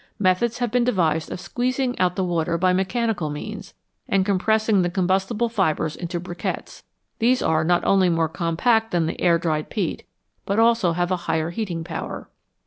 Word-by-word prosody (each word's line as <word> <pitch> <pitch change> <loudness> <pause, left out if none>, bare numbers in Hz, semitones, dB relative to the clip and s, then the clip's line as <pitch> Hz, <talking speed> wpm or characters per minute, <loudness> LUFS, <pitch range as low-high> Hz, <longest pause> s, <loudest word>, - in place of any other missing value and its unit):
Methods 205 +5 +1
have 245 -3 -1
been 245 0 +2
devised 165 -9 +1
of - - -5
squeezing 255 +4 -1
out 180 -1 +2
the 190 - 0
water 170 -1 0
by 185 +1 +2
mechanical 190 -2 0
means, 200 +7 -7 0.3
and 195 -1 +2
compressing 215 +1 +2
the 175 - +1
combustible 190 +5 0
fibres 165 -8 0
into 175 0 -4
briquettes; 175 0 -5 0.4
these 250 +2 +3
are 160 0 +2
not 175 +2 +2
only 190 -2 +4
more 165 -1 +1
compact 190 +8 +1
than 175 -4 +1
the 160 - -4
air 170 -2 +4
dried 155 -2 -2
peat, 190 -7 -3 0.4
but 200 - -2
have 225 - +6
also 230 -6 +3
a - - 0
higher 175 -2 -1
heating 175 -4 -3
power. 165 -1 -6
185 Hz, 175 wpm, -23 LUFS, 170-220 Hz, 0.4 s, have